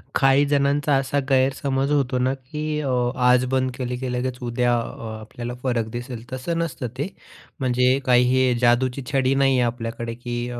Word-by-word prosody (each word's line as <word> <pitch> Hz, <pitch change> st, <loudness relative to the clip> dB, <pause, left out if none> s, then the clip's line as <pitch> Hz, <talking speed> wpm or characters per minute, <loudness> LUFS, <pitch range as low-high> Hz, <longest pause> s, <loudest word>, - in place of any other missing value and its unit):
काही 135 Hz, +1 st, +4 dB
जणांचा 145 Hz, 0 st, +2 dB
असा 135 Hz, +1 st, 0 dB
गैरसमज 135 Hz, +1 st, +1 dB
होतो 135 Hz, -3 st, +1 dB
ना, 130 Hz, +1 st, +1 dB
की 150 Hz, +3 st, -4 dB
अ, 140 Hz, -, -2 dB, 0.3 s
आज 125 Hz, 0 st, +4 dB
बंद 130 Hz, -1 st, +1 dB
केले, 125 Hz, -1 st, -3 dB
की 130 Hz, 0 st, -4 dB
लगेच 125 Hz, 0 st, -2 dB
उद्या 120 Hz, 0 st, +1 dB
अ, 110 Hz, -1 st, -6 dB
आपल्याला 120 Hz, +3 st, -7 dB
फरक 120 Hz, -4 st, 0 dB
दिसेल 120 Hz, -1 st, -6 dB
तसं 130 Hz, +6 st, -3 dB
नसतं 130 Hz, -7 st, -3 dB
ते, 145 Hz, +5 st, -1 dB, 0.5 s
म्हणजे 125 Hz, 0 st, +2 dB
काही 125 Hz, -1 st, +5 dB
हे 130 Hz, -1 st, +3 dB
जादूची 125 Hz, +2 st, +2 dB
छडी 135 Hz, -1 st, +2 dB
नाही 135 Hz, -1 st, +3 dB
आहे 120 Hz, -, +3 dB
आपल्याकडे, 115 Hz, 0 st, -4 dB
की 120 Hz, 0 st, -5 dB
अ, 120 Hz, -1 st, -5 dB
130 Hz, 175 wpm, -23 LUFS, 120-135 Hz, 0.5 s, काही